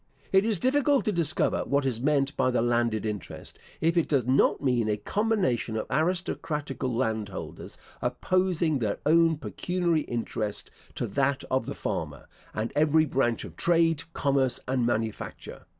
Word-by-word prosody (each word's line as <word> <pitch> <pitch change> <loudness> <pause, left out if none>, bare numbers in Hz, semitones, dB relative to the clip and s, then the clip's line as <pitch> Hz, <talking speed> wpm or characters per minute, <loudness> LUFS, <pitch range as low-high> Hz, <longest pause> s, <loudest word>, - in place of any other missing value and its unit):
It 190 +1 +4
is 220 -3 +1
difficult 280 - +2
to 215 - +2
discover 170 -6 +1
what 140 0 0
is 120 -3 -1
meant 140 0 +1
by 130 - +2
the 125 -2 +1
landed 120 -2 +1
interest, 105 -3 -6 0.2
if 165 +2 +2
it 170 - +2
does 135 -6 +2
not 130 +2 +3
mean 125 -5 +1
a 105 - +1
combination 180 - 0
of 110 - -2
aristocratical 155 -5 -1
landholders, 110 -5 -3 0.2
opposing 180 -5 +1
their 105 -4 -1
own 165 +1 +4
pecuniary 170 +1 -1
interest 115 -4 -3 0.2
to - - -2
that 140 0 0
of 130 0 +1
the - - -4
farmer, - - -4 0.2
and 110 +2 -3
every 155 +1 +4
branch 125 -5 0
of - - -11
trade, 165 -2 +2
commerce, 135 -3 +1
and 125 -2 +1
manufacture. 110 -2 -4
140 Hz, 150 wpm, -27 LUFS, 120-165 Hz, 0.2 s, It